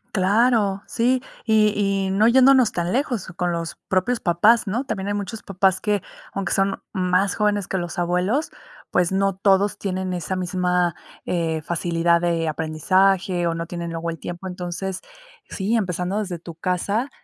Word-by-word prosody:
Claro, 205 Hz, 0 st, +2 dB
sí. 250 Hz, +2 st, +1 dB, 0.2 s
Y 215 Hz, -2 st, +3 dB
y 195 Hz, -1 st, 0 dB
no 205 Hz, +4 st, +4 dB
yéndonos 260 Hz, -1 st, +6 dB
tan 175 Hz, +2 st, -2 dB
lejos 245 Hz, -, -1 dB
con 175 Hz, 0 st, -1 dB
los 170 Hz, -1 st, -3 dB
propios 190 Hz, +6 st, +1 dB
papás, 210 Hz, +7 st, +4 dB
¿no? 225 Hz, +7 st, -2 dB
También 200 Hz, -5 st, -3 dB
hay -, -, 0 dB
muchos 205 Hz, +2 st, -5 dB
papás 190 Hz, -1 st, +1 dB
que, 210 Hz, -2 st, 0 dB, 0.3 s
aunque 195 Hz, -1 st, -2 dB
son 195 Hz, 0 st, 0 dB
más 185 Hz, 0 st, +1 dB
jóvenes 205 Hz, -2 st, +1 dB
que 190 Hz, -, -2 dB
los 175 Hz, -1 st, -4 dB
abuelos, 180 Hz, -, 0 dB, 0.4 s
pues, 180 Hz, 0 st, +2 dB
no 195 Hz, 0 st, +1 dB
todos 195 Hz, +1 st, +2 dB
tienen 185 Hz, -1 st, -3 dB
esa 180 Hz, +1 st, -3 dB
misma, 180 Hz, -1 st, 0 dB, 0.3 s
eh, 165 Hz, -2 st, -1 dB
facilidad 170 Hz, +1 st, +1 dB
de 170 Hz, -2 st, 0 dB
aprendizaje, 175 Hz, +4 st, +1 dB
o 165 Hz, -1 st, 0 dB
no 165 Hz, 0 st, -3 dB
tienen 170 Hz, 0 st, -5 dB
luego 165 Hz, 0 st, -3 dB
el 165 Hz, -, -4 dB
tiempo. 175 Hz, +3 st, -7 dB
Entonces, 180 Hz, +1 st, -5 dB, 0.5 s
sí, 205 Hz, +4 st, -1 dB
empezando 185 Hz, -1 st, -1 dB
desde 185 Hz, -5 st, -4 dB
tu 170 Hz, 0 st, -10 dB
casa, 200 Hz, -, -1 dB
190 Hz, 165 wpm, -22 LUFS, 175-205 Hz, 0.5 s, yéndonos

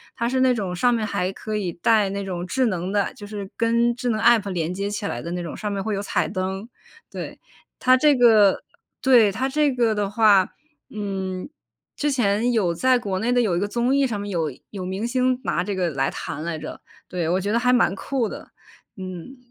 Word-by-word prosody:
它 235 Hz, -1 st, -1 dB
是 260 Hz, +1 st, +1 dB
那 260 Hz, -1 st, +4 dB
种 195 Hz, -6 st, -3 dB
上 245 Hz, +7 st, +3 dB
面 225 Hz, -2 st, 0 dB
还 185 Hz, -2 st, -1 dB
可 215 Hz, +2 st, -5 dB
以 185 Hz, -4 st, -2 dB
带 205 Hz, +4 st, +2 dB
那 200 Hz, 0 st, -3 dB
种 180 Hz, -2 st, -4 dB
智 255 Hz, +6 st, +1 dB
能 185 Hz, -2 st, -2 dB
的， 205 Hz, -1 st, 0 dB
就 205 Hz, -, -10 dB
是 205 Hz, -2 st, -7 dB
跟 235 Hz, +1 st, +2 dB
智 245 Hz, 0 st, -2 dB
能 220 Hz, -2 st, 0 dB
App 230 Hz, -3 st, +4 dB
连 170 Hz, -2 st, -2 dB
接 200 Hz, +2 st, -3 dB
起 205 Hz, 0 st, -3 dB
来 120 Hz, -, -3 dB
的 170 Hz, -, -6 dB
那 175 Hz, 0 st, -3 dB
种， 170 Hz, -3 st, -6 dB
上 210 Hz, -1 st, -3 dB
面 195 Hz, -1 st, -2 dB
会 215 Hz, 0 st, -1 dB
有 195 Hz, -, -2 dB
彩 185 Hz, -5 st, 0 dB
灯， 190 Hz, +4 st, -4 dB, 0.4 s
对。 -, -, -7 dB, 0.4 s
它 255 Hz, 0 st, +6 dB
这 295 Hz, +2 st, +5 dB
个 220 Hz, -5 st, +5 dB, 0.4 s
对， 240 Hz, -6 st, +5 dB
它 260 Hz, +7 st, -1 dB
这 295 Hz, +1 st, +2 dB
个 235 Hz, -3 st, +1 dB
的 205 Hz, -1 st, -1 dB
话， 205 Hz, -3 st, +4 dB, 0.4 s
嗯， 190 Hz, -2 st, -4 dB, 0.5 s
之 295 Hz, 0 st, 0 dB
前 235 Hz, -2 st, +1 dB
有 200 Hz, -8 st, +1 dB
在 255 Hz, +8 st, +3 dB
国 195 Hz, -5 st, -3 dB
内 235 Hz, +4 st, 0 dB
的 245 Hz, -, +3 dB
有 205 Hz, -7 st, +1 dB
一 -, -, +1 dB
个 205 Hz, -, -1 dB
综 240 Hz, +4 st, +1 dB
艺 280 Hz, 0 st, +3 dB
上 220 Hz, -6 st, -2 dB
面 205 Hz, -, -5 dB
有 165 Hz, -6 st, -1 dB, 0.2 s
有 190 Hz, -3 st, -5 dB
明 190 Hz, +5 st, -3 dB
星 255 Hz, 0 st, +1 dB
拿 -, -, 0 dB
这 200 Hz, +2 st, -3 dB
个 180 Hz, -2 st, 0 dB
来 135 Hz, -1 st, 0 dB
弹 150 Hz, +2 st, -6 dB
来 170 Hz, -1 st, -3 dB
着。 155 Hz, -, -8 dB, 0.3 s
对， 175 Hz, -3 st, -2 dB
我 180 Hz, +2 st, +2 dB
觉 200 Hz, +3 st, -2 dB
得 -, -, +3 dB
还 250 Hz, +1 st, +2 dB
蛮 230 Hz, -7 st, +3 dB
酷 245 Hz, +3 st, -2 dB
的， -, -, -9 dB, 0.5 s
嗯。 185 Hz, +7 st, -8 dB
205 Hz, 250 characters per minute, -23 LUFS, 185-240 Hz, 0.5 s, 它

